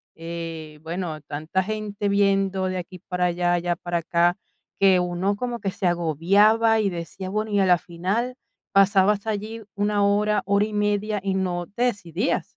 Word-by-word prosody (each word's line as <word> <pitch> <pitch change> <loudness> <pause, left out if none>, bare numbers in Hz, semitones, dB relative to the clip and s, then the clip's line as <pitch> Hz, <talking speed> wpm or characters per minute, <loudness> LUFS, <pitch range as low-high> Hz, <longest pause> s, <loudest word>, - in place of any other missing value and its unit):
eh, 165 -2 -7
bueno, 165 -1 -4
tanta 155 +6 -2
gente 210 0 -3
viendo 195 -1 +2
de 185 0 -2
aquí 180 +1 -7
para 180 +1 -2
allá, 175 0 +1
allá 175 0 0
para 175 0 -3
acá, 170 +2 +2 0.4
que 190 -2 +5
uno 180 +3 0
como 240 +2 -3
que 195 -2 -2
se 190 - -5
agobiaba 200 +7 +3
y 205 - +1
decía, 175 +2 -6
bueno, 215 +1 -2
y 205 - +2
a 190 - +4
la 180 -1 +5
final 190 +10 -2 0.4
pasabas 195 +1 +4
allí 220 +1 -4
1 205 0 +1
hora, 205 +1 +2
hora 200 +1 +3
y 215 - -7
media, 210 0 0
y 195 -1 0
no 175 -2 -1
te 245 - 0
decidías. 205 - -1
190 Hz, 170 wpm, -24 LUFS, 175-205 Hz, 0.4 s, que